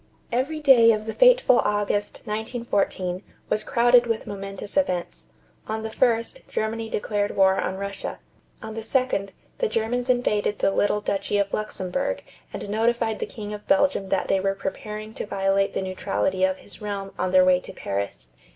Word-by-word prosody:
Every 270 +6 -1
day 245 -6 +7
of 215 0 -3
the 220 - -4
fateful - - +6
August, 205 0 -1
1914, 210 -5 -2 0.3
was 215 - +1
crowded 240 0 +4
with 225 -1 -1
momentous 195 0 -6
events. 185 -12 -1 0.4
On 220 0 -3
the 220 - -4
1st, 235 - 0
Germany 225 +1 -2
declared 205 -1 -1
war 190 0 +4
on 190 - -2
Russia. 200 0 -5 0.5
On 220 0 -6
the 225 - -5
2d, 230 -4 0 0.3
the 480 - +2
Germans 245 - -1
invaded 210 -5 +1
the - - +2
little 205 +1 +1
duchy 200 0 -1
of 200 0 0
Luxemburg 215 - -2 0.3
and - - -6
notified 225 +1 0
the - - -3
King 210 -2 -7
of 210 0 -9
Belgium 285 -9 +2
that 195 - 0
they 195 - +2
were 195 +1 0
preparing 210 +3 -5
to - - -5
violate 195 0 +1
the - - -1
neutrality 185 - -1
of 190 0 -1
his 205 - -12
realm 200 -2 -4
on 185 - 0
their 185 0 +6
way 180 -1 +5
to - - -10
Paris. 100 -11 -4
210 Hz, 170 wpm, -24 LUFS, 195-230 Hz, 0.5 s, day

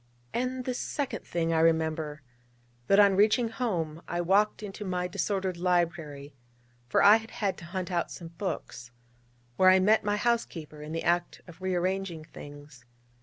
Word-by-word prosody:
And 255 +1 -2
this 250 -1 -2
second 285 -3 -4
thing 165 -1 0
I 160 - +2
remember: 160 -2 +1 0.6
that 195 - +5
on 200 -2 +6
reaching 220 +4 +3
home, 175 - -2
I 175 - -2
walked 200 +5 +2
into 205 0 -6
my 180 -2 -2
disordered 190 0 -2
library 170 -5 -1 0.5
(for - - +3
I 205 +2 +9
had 225 0 -10
had 200 -3 -2
to 170 - -10
hunt 185 +1 -4
out 175 -1 0
some 170 -2 -8
books), 165 -8 -5 0.7
where 185 - +6
I 185 - +7
met 215 +4 +4
my 205 0 0
housekeeper 180 -10 -2
in 150 +1 -7
the 165 - -3
act 175 0 0
of 175 0 -14
rearranging 185 -2 -1
things. 145 -4 -12
180 Hz, 165 wpm, -28 LUFS, 160-205 Hz, 0.7 s, I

